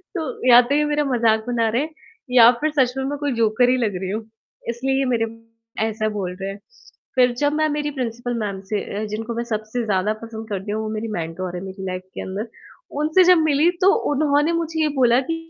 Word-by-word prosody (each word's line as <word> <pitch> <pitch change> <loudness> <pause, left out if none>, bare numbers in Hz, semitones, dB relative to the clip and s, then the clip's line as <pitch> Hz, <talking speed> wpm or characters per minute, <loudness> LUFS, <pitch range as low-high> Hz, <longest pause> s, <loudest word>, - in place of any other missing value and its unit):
तो 300 -6 -3
या 240 +1 +10
तो 275 +4 -1
ये 300 0 +2
मेरा 295 0 +1
मज़ाक 225 -4 +2
बना 230 -2 +1
रहे 235 +5 +1
हैं 310 - -3 0.4
या 240 -2 +8
फ़िर 310 0 +1
सच 250 -1 +3
में 265 - -1
मैं 290 +1 -3
कोई 290 -3 -1
जोकर 225 +3 +3
ही 255 - +3
लग 215 -6 -1
रही 190 - -3
हूँ, 220 +1 -3 0.5
इसलिए 265 +3 -1
ये 270 - +1
मेरे 225 -1 +1 0.6
ऐसा 215 0 -1
बोल 180 -2 -3
रहे 195 - -3
हैं। 200 - -8 0.6
फ़िर 250 -1 +4
जब 290 +1 +2
मैं 310 0 +1
मेरी 295 0 -2
प्रिंसिपल 240 0 -3
मैम 200 -2 -3
से 205 - +1 0.2
अ, - - -2
जिनको 220 +2 -4
मैं 235 - -2
सबसे 215 +3 -3
ज़्यादा 205 +1 +1
पसंद 225 -1 -8
करती 200 +1 -4
हूँ, 220 +1 -2
वो 215 - -4
मेरी 225 +1 -3
मेंटर 175 +2 -4
हैं - - -6
मेरी 190 0 -7
लाइफ़ 185 0 -4
के - - -4
अंदर, 205 +4 -5 0.5
उनसे 315 +5 +4
जब - - +3
मिली 295 +4 +4 0.2
तो 395 - +7 0.2
उन्होंने 295 +2 +2
मुझे 320 0 -3
ये - - +3
बोला 245 0 +5
कि - - 0
235 Hz, 230 wpm, -22 LUFS, 215-280 Hz, 0.6 s, या